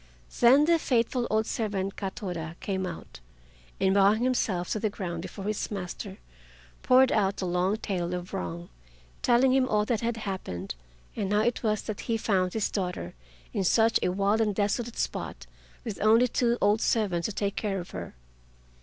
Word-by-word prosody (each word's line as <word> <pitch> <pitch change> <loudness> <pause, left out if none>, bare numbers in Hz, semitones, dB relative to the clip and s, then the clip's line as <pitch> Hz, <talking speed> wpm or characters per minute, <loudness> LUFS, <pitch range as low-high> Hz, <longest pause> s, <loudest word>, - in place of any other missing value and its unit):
Then 265 +5 +7
the 335 0 +4
faithful 240 -2 +1
old 220 0 +2
servant 200 -4 -2
Katoda 180 -5 -5
came 190 -2 -2
out, 165 - -9 0.6
and 190 0 +3
bowing 200 +3 +4
himself 210 -8 0
to 215 - 0
the 215 - 0
ground 175 -5 -5
before 190 +2 -7
his 210 0 -2
master, 195 0 -6 0.6
poured 255 0 +5
out 200 -2 +1
the 190 - -2
long 180 +3 +1
tale 180 -5 -2
of 180 +1 -7
wrong, 85 0 -4 0.5
telling 255 +2 +4
him 260 -1 +3
all 210 0 +2
that 225 -1 0
had 230 0 -1
happened, 185 - -5 0.4
and 200 -3 -2
how 210 0 +3
it 235 +2 0
was 215 -3 0
that 215 -3 -5
he 225 - +2
found 185 -4 +1
his 220 -2 -1
daughter 180 - -3 0.4
in 195 - 0
such 225 +5 +4
a - - +1
wild 200 +4 +1
and 210 -3 +1
desolate 220 +3 -1
spot - - -3 0.4
with 220 -6 -5
only 225 +4 +5
two 240 0 +1
old 205 +2 +3
servants 190 -7 +1
to - - -4
take 200 0 -2
care 200 -3 -1
of 175 - -8
her. 85 -7 -7
205 Hz, 180 wpm, -28 LUFS, 185-225 Hz, 0.6 s, Then